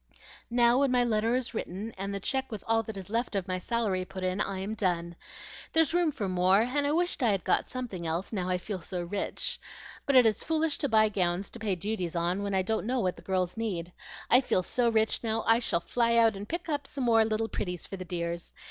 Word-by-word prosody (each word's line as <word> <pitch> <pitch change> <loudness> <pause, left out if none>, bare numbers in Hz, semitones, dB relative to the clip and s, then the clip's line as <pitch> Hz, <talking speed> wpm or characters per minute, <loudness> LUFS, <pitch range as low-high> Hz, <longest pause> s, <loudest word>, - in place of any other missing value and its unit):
"Now, 240 +1 +4
when 280 -1 +3
my 250 -1 +3
letter 225 0 +1
is 255 -1 -2
written 215 +1 -4
and 195 +1 -4
the 200 - -3
check 265 +6 -2
with 215 - -6
all 225 0 +3
that 220 -2 -7
is 195 +1 -8
left 230 -1 -1
of 195 -1 -1
my 185 -1 -1
salary 200 -2 -1
put 190 0 -7
in, 185 +2 0
I 195 -2 -2
am 195 +3 -3
done. 175 -5 -1 0.6
There's 320 -1 +3
room 345 -3 +3
for 205 -8 -3
more, 185 +2 +4
and 285 +5 +1
I - - +1
wish 350 +3 +1
I'd 200 -7 +2
got - - +1
something 225 -10 -5
else, 170 +7 -2
now 185 -3 -1
I 180 - +1
feel 185 0 -5
so 175 +1 -4
rich. 195 +4 -2 0.5
But 280 - +2
it 250 -2 +8
is 215 -2 +2
foolish 320 -1 +1
to 285 - 0
buy 215 -1 +5
gowns 185 -1 -1
to 235 - -9
pay 210 -4 0
duties 180 -2 -3
on, 175 +3 0
when 200 -1 -1
I 190 - +2
don't 220 +2 -1
know 255 +1 +1
what 185 -5 0
the - - -13
girls 185 -2 -1
need. 180 -7 -3 0.4
I 250 - +6
feel 185 -7 +1
so 240 +6 +1
rich 220 -1 +2
now, 225 0 0
I 225 +1 +5
shall 230 -8 +1
fly 235 +4 +1
out 225 -2 +5
and 200 +1 -7
pick 340 +1 -3
up 290 -3 -2
some 275 - -4
more 225 -2 +5
little 220 0 0
pretties 180 -5 -4
for - - -6
the 185 - -5
dears. 170 -1 -4
215 Hz, 245 wpm, -29 LUFS, 185-240 Hz, 0.6 s, it